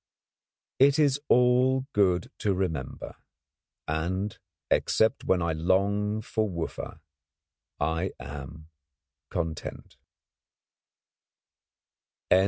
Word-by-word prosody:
It 140 Hz, +2 st, +6 dB
is 145 Hz, -2 st, +3 dB
all 125 Hz, +2 st, +4 dB
good 90 Hz, -4 st, +2 dB
to 100 Hz, -2 st, +1 dB
remember, 80 Hz, -8 st, -3 dB, 0.7 s
and, 90 Hz, +6 st, -1 dB, 0.4 s
except 110 Hz, 0 st, +2 dB
when 90 Hz, -2 st, +2 dB
I 85 Hz, -1 st, 0 dB
long 100 Hz, +6 st, +1 dB
for 110 Hz, -1 st, -1 dB
Wooffa, 85 Hz, -3 st, -5 dB, 0.8 s
I 80 Hz, +4 st, 0 dB
am 75 Hz, +3 st, -8 dB, 0.6 s
content. 80 Hz, -3 st, -5 dB
95 Hz, 75 wpm, -28 LUFS, 80-110 Hz, 0.8 s, It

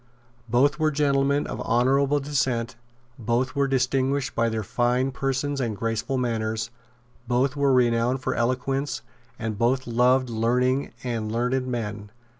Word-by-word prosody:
Both 130 Hz, +7 st, +3 dB
were 155 Hz, 0 st, +3 dB
gentlemen 140 Hz, -1 st, +1 dB
of -, -, -5 dB
honourable 135 Hz, +4 st, +2 dB
descent; 130 Hz, -5 st, -1 dB, 0.4 s
both 120 Hz, +3 st, 0 dB
were 140 Hz, 0 st, +2 dB
distinguished 135 Hz, 0 st, 0 dB
by 115 Hz, 0 st, +1 dB
their 110 Hz, -1 st, -2 dB
fine 125 Hz, +5 st, +1 dB
persons 135 Hz, +1 st, -1 dB
and 115 Hz, -4 st, -2 dB
graceful 115 Hz, +4 st, -2 dB
manners; 115 Hz, -1 st, -2 dB, 0.6 s
both 130 Hz, +3 st, +1 dB
were 140 Hz, -1 st, +2 dB
renowned 120 Hz, 0 st, +2 dB
for -, -, 0 dB
eloquence; 130 Hz, +4 st, -1 dB, 0.3 s
and 110 Hz, -2 st, -4 dB
both 130 Hz, +3 st, +2 dB
loved 125 Hz, +2 st, +3 dB
learning 125 Hz, +4 st, +1 dB
and 115 Hz, -3 st, -3 dB
learned 125 Hz, +3 st, 0 dB
men. 105 Hz, -4 st, -4 dB
125 Hz, 135 wpm, -25 LUFS, 115-135 Hz, 0.6 s, Both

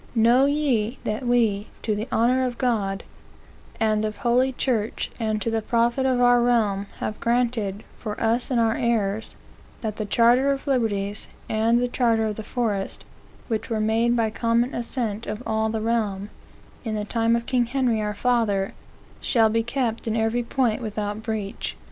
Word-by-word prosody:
Know 240 Hz, +4 st, +5 dB
ye, 270 Hz, -6 st, 0 dB
that 215 Hz, +4 st, -3 dB
We, 220 Hz, -4 st, +2 dB, 0.2 s
to 215 Hz, -, 0 dB
the 215 Hz, +3 st, -3 dB
honor 250 Hz, +3 st, +3 dB
of 245 Hz, -2 st, -2 dB
Cod, 205 Hz, -6 st, 0 dB, 0.8 s
and 215 Hz, -1 st, +2 dB
of 215 Hz, -1 st, -3 dB
Holy 250 Hz, +2 st, +2 dB
Church, 235 Hz, -4 st, -1 dB
and 215 Hz, -2 st, 0 dB
to 230 Hz, -, -1 dB
the 225 Hz, 0 st, 0 dB
profit 235 Hz, +4 st, +1 dB
of 255 Hz, -1 st, +2 dB
our 245 Hz, 0 st, +5 dB
Realm, 215 Hz, -5 st, +1 dB
have 215 Hz, -, -4 dB
granted, 230 Hz, -4 st, 0 dB, 0.2 s
for 210 Hz, -1 st, -5 dB
us 230 Hz, +2 st, +1 dB
and 250 Hz, -3 st, +1 dB
our 225 Hz, -1 st, +3 dB
heirs, 225 Hz, -3 st, -1 dB, 0.5 s
that 215 Hz, -2 st, -3 dB
the 215 Hz, -, -3 dB
Charter 240 Hz, +6 st, +4 dB
of 275 Hz, -1 st, -3 dB
Liberties, 210 Hz, -6 st, -1 dB, 0.2 s
and 225 Hz, +2 st, +2 dB
the 245 Hz, -, +1 dB
Charter 230 Hz, -3 st, +1 dB
of 215 Hz, -1 st, -2 dB
the 220 Hz, -, -6 dB
Forest, 210 Hz, -4 st, -2 dB, 0.4 s
which 220 Hz, -3 st, -2 dB
were 225 Hz, -2 st, -1 dB
made 225 Hz, +2 st, +2 dB
by 225 Hz, -2 st, +1 dB
common 235 Hz, +2 st, +1 dB
assent 230 Hz, -3 st, -3 dB
of 215 Hz, +4 st, -4 dB
all 220 Hz, 0 st, 0 dB
the 220 Hz, 0 st, -2 dB
Realm, 215 Hz, -3 st, -1 dB, 0.5 s
in 220 Hz, -3 st, -3 dB
the 210 Hz, -1 st, -2 dB
time 230 Hz, +1 st, +1 dB
of 235 Hz, 0 st, -2 dB
King 245 Hz, -2 st, +1 dB
Henry 245 Hz, -3 st, +1 dB
our 210 Hz, 0 st, -2 dB
Father, 215 Hz, -4 st, +1 dB, 0.5 s
shall 225 Hz, -3 st, +3 dB
be 225 Hz, +1 st, +1 dB
kept 235 Hz, -1 st, -2 dB
in 220 Hz, -, 0 dB
every 225 Hz, +2 st, +1 dB
point 240 Hz, -1 st, 0 dB
without 210 Hz, -1 st, -3 dB
breach. 220 Hz, -3 st, -4 dB
225 Hz, 175 wpm, -24 LUFS, 215-240 Hz, 0.8 s, Know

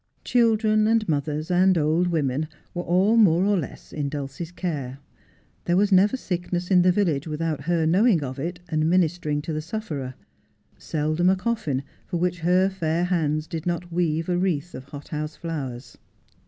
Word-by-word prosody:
Children, 220 Hz, -3 st, +3 dB
and 225 Hz, -1 st, +2 dB
mothers, 150 Hz, +1 st, -1 dB
and 185 Hz, +1 st, +4 dB
old 160 Hz, +3 st, +2 dB
women, 155 Hz, -3 st, 0 dB, 0.3 s
were 175 Hz, -, -2 dB
all 190 Hz, +6 st, +3 dB
more 185 Hz, -4 st, +5 dB
or 205 Hz, 0 st, +3 dB
less 165 Hz, -8 st, -6 dB
in 145 Hz, -2 st, -2 dB
Dulcie's 145 Hz, +3 st, -5 dB
care. 145 Hz, -8 st, -4 dB, 0.7 s
There 175 Hz, -, +2 dB
was 205 Hz, +1 st, +3 dB
never 200 Hz, +7 st, +4 dB
sickness 180 Hz, -3 st, -3 dB
in 180 Hz, -1 st, +6 dB
the 180 Hz, +1 st, +5 dB
village 170 Hz, -7 st, 0 dB
without 155 Hz, -1 st, -2 dB
her 170 Hz, -1 st, +1 dB
knowing 180 Hz, 0 st, +3 dB
of 130 Hz, 0 st, -5 dB
it 175 Hz, +5 st, -4 dB
and 155 Hz, 0 st, +1 dB
ministering 165 Hz, -4 st, +1 dB
to 160 Hz, -, -4 dB
the 155 Hz, -, -2 dB
sufferer; 155 Hz, -, -5 dB, 0.6 s
seldom 155 Hz, +3 st, 0 dB
a 190 Hz, -, +4 dB
coffin 185 Hz, -, -2 dB, 0.2 s
for 175 Hz, -, -2 dB
which 180 Hz, 0 st, -1 dB
her 180 Hz, +3 st, +3 dB
fair 170 Hz, -3 st, -1 dB
hands 155 Hz, -4 st, 0 dB
did 160 Hz, +1 st, -5 dB
not 175 Hz, 0 st, -2 dB
weave 165 Hz, -2 st, 0 dB
a 175 Hz, -1 st, +1 dB
wreath 175 Hz, -3 st, -1 dB
of 130 Hz, -, -8 dB
hot 145 Hz, +1 st, -10 dB
house 150 Hz, 0 st, -4 dB
flowers. 135 Hz, -7 st, -6 dB
170 Hz, 175 wpm, -24 LUFS, 150-185 Hz, 0.7 s, in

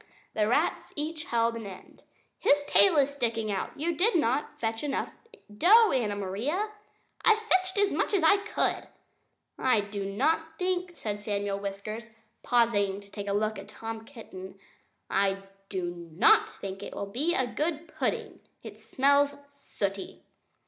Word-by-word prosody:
The 210 Hz, -1 st, +1 dB
rats 295 Hz, +9 st, 0 dB
each 310 Hz, +2 st, -4 dB
held 230 Hz, -4 st, +1 dB
an 225 Hz, -3 st, -6 dB
end. 185 Hz, -1 st, -12 dB, 0.4 s
"His 290 Hz, 0 st, +4 dB
tail 365 Hz, -5 st, +5 dB
is 280 Hz, -1 st, +4 dB
sticking 230 Hz, -5 st, -1 dB
out! 195 Hz, +7 st, -4 dB
You 335 Hz, +2 st, 0 dB
did 410 Hz, +7 st, +3 dB
not 290 Hz, -3 st, 0 dB
fetch 225 Hz, +1 st, -2 dB
enough 290 Hz, -2 st, -2 dB, 0.4 s
dough, 425 Hz, -, +6 dB
Anna 220 Hz, -6 st, 0 dB
Maria." 240 Hz, -, -2 dB, 0.5 s
"I 445 Hz, -, +6 dB
fetched 375 Hz, -3 st, +1 dB
as 405 Hz, 0 st, +3 dB
much -, -, 0 dB
as 365 Hz, -, +1 dB
I 400 Hz, +5 st, +6 dB
could 400 Hz, -, -8 dB
carry," -, -, +4 dB, 0.9 s
replied -, -, -21 dB
Anna 260 Hz, -, 0 dB
Maria. 225 Hz, -4 st, +5 dB
"I -, -, -14 dB
do 200 Hz, -2 st, -3 dB
not 320 Hz, +10 st, 0 dB
think" 360 Hz, -1 st, -1 dB
said 205 Hz, -7 st, -4 dB
Samuel 205 Hz, -1 st, -2 dB
Whiskers, 205 Hz, +3 st, -5 dB, 0.3 s
pausing 205 Hz, -5 st, +2 dB
to 200 Hz, 0 st, -17 dB
take 205 Hz, -1 st, -6 dB
a 200 Hz, -, 0 dB
look 215 Hz, 0 st, 0 dB
at 195 Hz, -, -10 dB
Tom 225 Hz, +1 st, -6 dB
Kitten 195 Hz, -6 st, -10 dB, 0.5 s
"I 195 Hz, 0 st, +1 dB, 0.3 s
do 175 Hz, -3 st, -4 dB
NOT 160 Hz, -, +5 dB
think 195 Hz, 0 st, -6 dB
it -, -, -7 dB
will 200 Hz, -, -3 dB
be 275 Hz, +12 st, -1 dB
a 260 Hz, -, +2 dB
good 305 Hz, +6 st, -2 dB
pudding. -, -, -3 dB, 0.2 s
It -, -, -10 dB
smells 285 Hz, +1 st, +3 dB, 0.2 s
sooty." 200 Hz, -8 st, -5 dB
230 Hz, 170 wpm, -28 LUFS, 200-315 Hz, 0.9 s, dough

